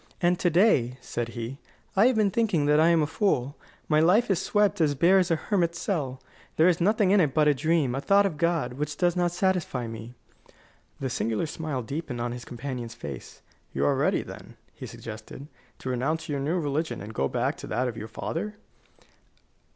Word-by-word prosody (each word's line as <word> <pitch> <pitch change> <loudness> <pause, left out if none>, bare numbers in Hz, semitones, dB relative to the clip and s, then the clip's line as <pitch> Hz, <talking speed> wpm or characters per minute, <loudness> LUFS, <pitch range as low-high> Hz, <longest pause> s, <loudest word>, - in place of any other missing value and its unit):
"And 175 0 +2
to 175 - +2
day," 160 - +3
said 120 -1 -4
he, 120 +4 -5 0.4
"I 205 +5 +6
have 255 - +2
been 210 -2 +2
thinking 190 -9 +1
that 150 +1 +4
I 160 - +5
am 170 -2 +4
a - - +2
fool. 145 - 0 0.3
My 155 -1 +3
life 195 +8 +4
is 190 -1 +1
swept 205 -5 +1
as 145 -2 +2
bare 180 +7 +5
as 180 -1 +1
a 165 - +3
hermit's 170 -1 -1
cell. 140 -10 -2 0.4
There 160 - +5
is 175 -1 +2
nothing 205 +1 +3
in 205 - +5
it 150 -7 +2
but 155 -1 +4
a 150 - +5
dream, 155 -2 +1
a 135 - -2
thought 200 +5 +4
of 175 -6 -2
God, 165 -6 0
which 150 +2 -4
does 175 -1 +2
not 175 -1 +2
satisfy 175 -8 0
me." 115 +1 -8 0.8
The 130 -2 -3
singular 115 +3 -1
smile 155 -4 -4
deepened 135 0 -5
on 120 0 -2
his 120 0 -7
companion's 120 -2 -6
face. 70 - -9 0.3
"You 70 +1 0
are - - +3
ready, - - +1
then," - - -11 0.2
he - - -8
suggested, 140 - -9 0.3
"to 130 - -6
renounce 145 +6 -1
your 145 -2 -2
new 155 +6 0
religion 155 +1 -2
and 105 +3 -8
go 70 - 0
back - - -1
to - - -8
that 130 +1 0
of 120 - -4
your 110 -1 -6
father?" 200 - -4
155 Hz, 205 wpm, -27 LUFS, 125-180 Hz, 0.8 s, I